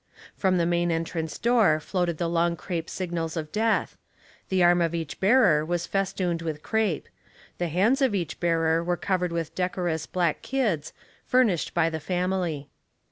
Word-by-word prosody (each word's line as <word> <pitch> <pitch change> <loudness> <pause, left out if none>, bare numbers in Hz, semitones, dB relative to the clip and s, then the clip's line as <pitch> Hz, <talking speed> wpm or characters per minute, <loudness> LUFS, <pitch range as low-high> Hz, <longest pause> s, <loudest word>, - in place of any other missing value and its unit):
From 185 -2 +2
the 170 - +2
main 175 0 +1
entrance 165 -1 -2
door 225 -10 +3
floated 175 0 -1
the 170 - -1
long 170 0 +1
crape 165 0 -4
signals 170 -3 -3
of 155 -1 -4
death; 225 +1 0 0.5
the 185 -1 +2
arm 175 0 +5
of 170 0 0
each 165 -3 -5
bearer 195 -8 +4
was 175 +1 -2
festooned 185 -3 -1
with 155 -2 -4
crape; 220 -8 0 0.5
the 175 - 0
hands 205 - +2
of 255 -6 +3
each 175 -4 -3
bearer 165 -1 +2
were 175 0 0
cov 185 -2 -1
ered 180 - 0
with 165 -2 -3
decorous 180 -3 -2
black 175 -4 0
kids, 215 - -1 0.4
furnished 230 -12 +2
by 170 -1 +3
the 160 -1 -3
family. 175 -3 -2
175 Hz, 170 wpm, -26 LUFS, 165-190 Hz, 0.5 s, arm